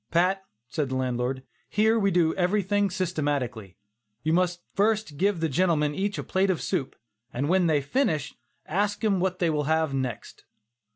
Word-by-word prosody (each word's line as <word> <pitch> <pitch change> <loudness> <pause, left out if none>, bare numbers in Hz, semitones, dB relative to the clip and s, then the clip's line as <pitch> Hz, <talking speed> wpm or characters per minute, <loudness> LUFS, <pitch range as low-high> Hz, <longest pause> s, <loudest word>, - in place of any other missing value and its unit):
"Pat," 185 +3 +2 0.3
said 145 +1 -2
the 130 - -2
landlord, 130 0 -1 0.3
"here 220 +2 +3
we 200 -2 +3
do 170 -3 +3
everything 200 +2 +1
systematically. 145 - -2 0.5
You 160 +1 +1
must 180 0 +1
first 215 -4 +1
give 195 +3 +1
the 165 - +2
gentlemen 150 -1 +1
each 200 +5 -2
a - - -3
plate 190 +1 +1
of 185 - +1
soup, 135 - -2 0.4
and 135 +4 -2
when 180 +1 +3
they 150 -3 +3
finish 150 - 0
that, - - -29 0.4
ask 205 +2 0
them 205 -4 +2
what 185 0 0
they 175 -4 +1
will 150 -1 0
have 160 -1 +1
next." 130 -4 -4
170 Hz, 175 wpm, -26 LUFS, 145-195 Hz, 0.5 s, here